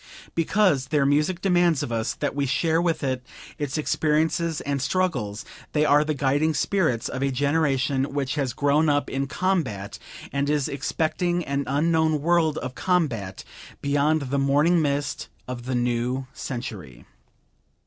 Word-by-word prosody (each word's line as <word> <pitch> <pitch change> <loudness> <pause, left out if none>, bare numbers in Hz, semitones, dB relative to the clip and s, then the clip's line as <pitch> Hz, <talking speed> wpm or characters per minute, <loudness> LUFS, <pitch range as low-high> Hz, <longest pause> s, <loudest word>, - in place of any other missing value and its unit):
Because 165 -5 +2
their 145 -1 +2
music 150 +6 +1
demands 175 -5 +3
of - - -4
us 115 0 -1
that 145 - -2
we 140 -1 -1
share 160 +5 +1
with 165 -3 0
it 130 -2 -1 0.4
its 145 0 -2
experiences 155 +2 +1
and 140 -1 -2
struggles, 135 - -1 0.3
they 150 0 +3
are 150 0 +5
the 155 0 -2
guiding 145 +3 +1
spirits 160 - +1
of 130 - -4
a 140 - +2
generation 140 -1 +1
which 140 -1 -1
has 135 -5 -1
grown 145 +3 +2
up 145 0 +1
in 135 +1 -1
combat 140 - -1 0.3
and 140 +1 0
is 150 -2 +1
expecting 170 +5 -1
an 140 0 -1
unknown 160 +2 +2
world 160 0 +2
of 130 0 -4
combat 130 - -1 0.4
beyond 145 +2 +1
the 140 - +1
morning 145 +5 +3
mist 145 -1 -2 0.2
of 125 -1 -6
the 130 - -1
new 120 +2 0
century. 95 - -7
145 Hz, 150 wpm, -25 LUFS, 130-160 Hz, 0.4 s, are